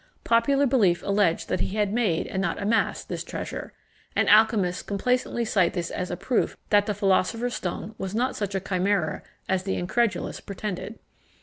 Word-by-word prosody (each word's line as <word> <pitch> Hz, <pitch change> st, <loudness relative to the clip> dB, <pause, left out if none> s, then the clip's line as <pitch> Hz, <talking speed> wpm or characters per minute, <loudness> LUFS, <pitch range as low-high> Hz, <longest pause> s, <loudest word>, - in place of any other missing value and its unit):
Popular 275 Hz, +5 st, +3 dB
belief 210 Hz, -10 st, +3 dB
alleged 200 Hz, -4 st, +1 dB
that -, -, -1 dB
he 195 Hz, -, -2 dB
had 210 Hz, -1 st, +1 dB
made, 210 Hz, -9 st, +1 dB
and 190 Hz, -, -3 dB
not 195 Hz, -, -1 dB
amassed, 215 Hz, +3 st, 0 dB
this -, -, -4 dB
treasure; -, -, -6 dB, 0.4 s
and -, -, +2 dB
alchymists 210 Hz, -4 st, +4 dB
complacently 240 Hz, +3 st, -1 dB
cite 190 Hz, -5 st, +2 dB
this 170 Hz, -2 st, -3 dB
as 180 Hz, -1 st, -3 dB
a 175 Hz, -, -3 dB
proof 240 Hz, +6 st, 0 dB
that 205 Hz, 0 st, +4 dB
the 210 Hz, -, -1 dB
philosopher's 205 Hz, +4 st, +1 dB
stone 195 Hz, +2 st, -4 dB
was 190 Hz, +1 st, -4 dB
not 250 Hz, +3 st, 0 dB
such 200 Hz, -2 st, -3 dB
a -, -, +1 dB
chimera 185 Hz, -3 st, 0 dB, 0.3 s
as 190 Hz, -1 st, +1 dB
the 190 Hz, +1 st, -2 dB
incredulous 225 Hz, +5 st, -1 dB
pretended. 200 Hz, +1 st, -5 dB
200 Hz, 175 wpm, -26 LUFS, 185-225 Hz, 0.4 s, alchymists